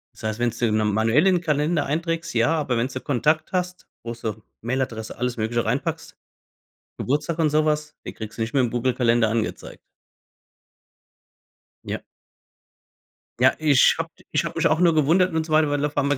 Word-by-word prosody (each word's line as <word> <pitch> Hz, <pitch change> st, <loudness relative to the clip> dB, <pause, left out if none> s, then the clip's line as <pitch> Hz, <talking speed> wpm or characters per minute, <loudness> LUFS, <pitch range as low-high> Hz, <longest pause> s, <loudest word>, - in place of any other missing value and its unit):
Das -, -, -15 dB
heißt, 110 Hz, +1 st, -2 dB
wenn's 120 Hz, -1 st, -1 dB
du 120 Hz, -2 st, +1 dB
manuell 110 Hz, -, +2 dB
im 180 Hz, -2 st, +3 dB
Kalender 150 Hz, -1 st, 0 dB
einträgst, 165 Hz, +3 st, -2 dB
ja, 120 Hz, +8 st, +2 dB
aber 140 Hz, -6 st, -1 dB
wenn's 125 Hz, +3 st, -1 dB
so 130 Hz, -, -5 dB
Kontakt 155 Hz, +4 st, 0 dB
hast, 180 Hz, 0 st, -3 dB, 0.2 s
wo 115 Hz, -, -5 dB
so 110 Hz, -2 st, -5 dB, 0.2 s
Mail-Adresse, 120 Hz, -2 st, -3 dB
alles 125 Hz, 0 st, -2 dB
Mögliche 115 Hz, +1 st, -1 dB
reinpackst, 155 Hz, +8 st, -3 dB, 0.8 s
Geburtstag 150 Hz, +5 st, -1 dB
und 160 Hz, -3 st, +2 dB
sowas, 150 Hz, 0 st, 0 dB
den -, -, -7 dB
kriegst 110 Hz, +1 st, -8 dB
du -, -, -1 dB
nicht 115 Hz, 0 st, -2 dB
mehr 135 Hz, -, +4 dB
im 120 Hz, -, -1 dB
Google-Kalender 120 Hz, -2 st, +2 dB
angezeigt. 110 Hz, 0 st, -3 dB, 2.1 s
Ja. -, -, -3 dB, 1.4 s
Ja, 130 Hz, +1 st, +5 dB
ich 150 Hz, -4 st, +5 dB
habe. -, -, -2 dB, 0.2 s
Ich -, -, +1 dB
habe -, -, -5 dB
mich -, -, +3 dB
auch 160 Hz, -, +1 dB
nur 175 Hz, -2 st, +4 dB
gewundert 165 Hz, +4 st, +3 dB
und 160 Hz, -1 st, 0 dB
so 160 Hz, -, -9 dB
weiter, 155 Hz, -1 st, +4 dB
weil 145 Hz, 0 st, -1 dB
auf 150 Hz, 0 st, -2 dB
einmal 145 Hz, 0 st, +2 dB
140 Hz, 175 wpm, -23 LUFS, 115-155 Hz, 2.1 s, Ja